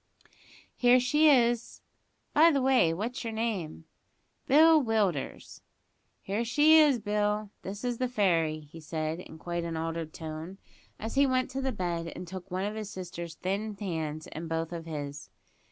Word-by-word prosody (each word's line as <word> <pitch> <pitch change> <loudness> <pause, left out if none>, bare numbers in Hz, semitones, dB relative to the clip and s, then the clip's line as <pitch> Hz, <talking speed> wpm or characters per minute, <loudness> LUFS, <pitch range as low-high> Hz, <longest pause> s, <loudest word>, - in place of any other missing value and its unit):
"Here 245 0 +5
she 300 +5 +4
is; 240 -4 +2 0.5
by 320 +3 +7
the 285 -4 +2
way, 255 -10 +4
what's 230 +10 -4
your 225 -1 -4
name?" 205 -9 -3 0.6
"Bill 310 +3 +6
Willders." 210 - -1 0.6
"Here 205 +4 -1
she 295 +7 +6
is, 295 -4 +5
Bill; 210 -1 -1
this 200 +3 -7
is 245 -2 -2
the 255 - +1
fairy," 165 -9 +1
he 150 +2 -13
said, 155 +1 -3
in 170 - -11
quite 170 +1 -4
an 165 -1 -4
altered 165 0 -3
tone, 160 +4 -7 0.4
as 225 - -5
he 280 0 +4
went 255 0 0
to 270 +1 -3
the 265 0 -1
bed, 170 -5 -3
and 180 - -7
took 185 +1 -8
one 185 +1 -2
of 210 - -3
his 215 -2 -5
sister's 170 -3 -7
thin 200 +5 -3
hands 160 -5 -3
in 165 +2 -7
both 165 0 -2
of 165 -1 -6
his. 145 -2 -6
195 Hz, 170 wpm, -29 LUFS, 165-245 Hz, 0.6 s, by